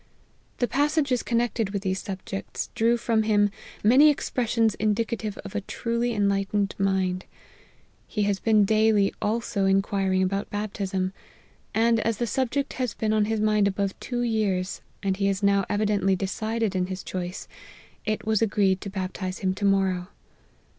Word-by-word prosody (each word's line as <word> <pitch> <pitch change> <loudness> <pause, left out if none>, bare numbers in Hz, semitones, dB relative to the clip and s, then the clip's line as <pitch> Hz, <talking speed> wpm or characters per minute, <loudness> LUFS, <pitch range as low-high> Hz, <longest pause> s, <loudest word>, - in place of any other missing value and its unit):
The 245 - +1
passages 285 -1 +1
connected 235 -3 0
with 200 -1 -3
these 190 -1 -1
subjects, 195 0 -5
drew 230 +2 +2
from 230 -2 +1
him 205 -2 +3 0.3
many 260 +8 +7
expressions 230 -6 +1
indicative 215 0 -1
of 195 - -8
a 210 - -1
truly 235 +4 -2
enlightened 200 -1 0
mind. 190 -1 0 0.8
He 210 - -1
has 200 -1 0
been 215 -2 +4
daily 215 -1 +3
also 210 -2 0
inquir 195 0 +1
ing 185 - +3
about 195 +2 -1
baptism; 195 -2 -2 0.6
and 230 +1 +3
as 225 -1 0
the 240 - 0
subject 265 +3 -1
has 245 -5 -1
been 215 -1 0
on 215 -1 +3
his 220 0 -1
mind 215 -1 +3
above 200 0 -1
two 245 -1 -2
years, 200 -5 0 0.2
and 190 -1 0
he 195 0 +1
is 195 +1 -2
now 200 -1 +3
evidently 205 -2 +2
decided 215 +2 -2
in 180 -1 0
his 185 0 -5
choice, 180 0 -5 0.6
it 215 +1 -2
was 220 -1 +2
agreed 195 -3 +2
to 200 - -5
baptize 185 -1 -4
him 185 - +2
to 200 +2 -3
morrow. 190 -2 +2
205 Hz, 160 wpm, -26 LUFS, 195-225 Hz, 0.8 s, many